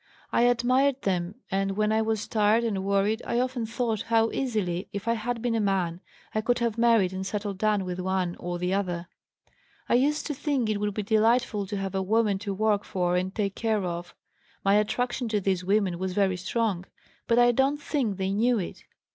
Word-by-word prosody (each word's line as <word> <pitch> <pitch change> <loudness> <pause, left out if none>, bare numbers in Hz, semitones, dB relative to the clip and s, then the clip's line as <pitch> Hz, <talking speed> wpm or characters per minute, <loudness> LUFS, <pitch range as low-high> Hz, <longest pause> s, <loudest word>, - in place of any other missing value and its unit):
I - - +2
admired 255 +3 +2
them 180 -1 -1 0.2
and 195 0 0
when 215 0 +2
I 220 0 +2
was 220 -1 -1
tired 215 +1 +3
and 200 -5 -1
worried 200 +3 +1
I 235 - -1
often 250 -2 -1
thought 225 -2 -1
how 225 0 +3
easily, 205 -9 -2
if 200 +2 -6
I 230 - +3
had 230 +1 -3
been 240 -1 +1
a 225 - +1
man, 185 -4 0 0.3
I 215 - +1
could 245 +2 +1
have 235 -3 0
married 230 -5 +3
and 190 0 -3
settled 200 -1 -4
down 210 -2 +1
with 180 0 -4
one 185 -1 -1
or 175 0 -3
the 180 +1 -1
other. 180 -3 -2 0.8
I - - +1
used 290 +5 +2
to 300 - -2
think 270 -5 0
it 205 - -1
would 205 -1 -2
be 210 - -2
delightful 220 -1 +2
to 205 +1 -3
have 195 -1 -3
a 190 - 0
woman 210 0 +1
to 200 0 -4
work 210 0 +1
for 180 -1 -1
and 185 +1 0
take 200 -3 -1
care 220 -2 0
of. 175 -1 -5 0.5
My 195 - +4
attraction 245 +4 0
to 215 -1 +1
these 190 -2 0
women 190 -2 +1
was 185 0 -2
very 195 -1 +2
strong, 190 -1 -1 0.4
but 230 - +3
I 240 0 +6
don't 270 +4 +2
think 255 - -1
they 190 0 -1
knew 235 +4 +2
it. 185 - -5
210 Hz, 210 wpm, -27 LUFS, 190-230 Hz, 0.8 s, I